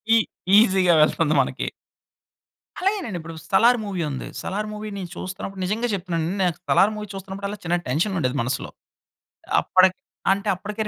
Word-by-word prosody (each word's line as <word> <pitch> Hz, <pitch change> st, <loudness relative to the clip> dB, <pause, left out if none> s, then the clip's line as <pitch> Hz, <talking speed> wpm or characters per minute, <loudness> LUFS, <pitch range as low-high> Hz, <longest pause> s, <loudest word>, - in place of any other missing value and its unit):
ఈ -, -, +7 dB, 0.4 s
ఈజీ‌గా 190 Hz, -5 st, +5 dB
వెళ్తుంది 155 Hz, 0 st, +3 dB
మనకి. 130 Hz, -, -3 dB, 1.1 s
అలాగేనండి 380 Hz, -, -1 dB
ఇప్పుడు 165 Hz, 0 st, -8 dB
'సలార్' 240 Hz, +5 st, +5 dB
మూవీ 195 Hz, -4 st, -3 dB
ఉంది. 135 Hz, -, -5 dB
'సలార్' 210 Hz, +2 st, -3 dB
మూవీ‌ని 210 Hz, -2 st, -6 dB
చూస్తున్నప్పుడు, 190 Hz, +1 st, -6 dB
నిజంగా 220 Hz, +6 st, 0 dB
చెప్తున్నానండి 175 Hz, -1 st, -2 dB
నేను 175 Hz, -3 st, +1 dB
'సలార్' 210 Hz, +3 st, +4 dB
మూవీ 210 Hz, 0 st, -6 dB
చూస్తున్నప్పుడు 195 Hz, +1 st, -6 dB
అల్లా 205 Hz, +1 st, -6 dB
చిన్న 175 Hz, +1 st, +2 dB
టెన్షనుండేది, 155 Hz, -2 st, 0 dB
మనసులో. 125 Hz, +2 st, -2 dB, 0.9 s
అప్పటి 185 Hz, 0 st, +5 dB, 0.4 s
అంటే 200 Hz, +2 st, -2 dB
అప్పటికే 205 Hz, +4 st, -7 dB
190 Hz, 140 wpm, -23 LUFS, 170-210 Hz, 1.1 s, ఈ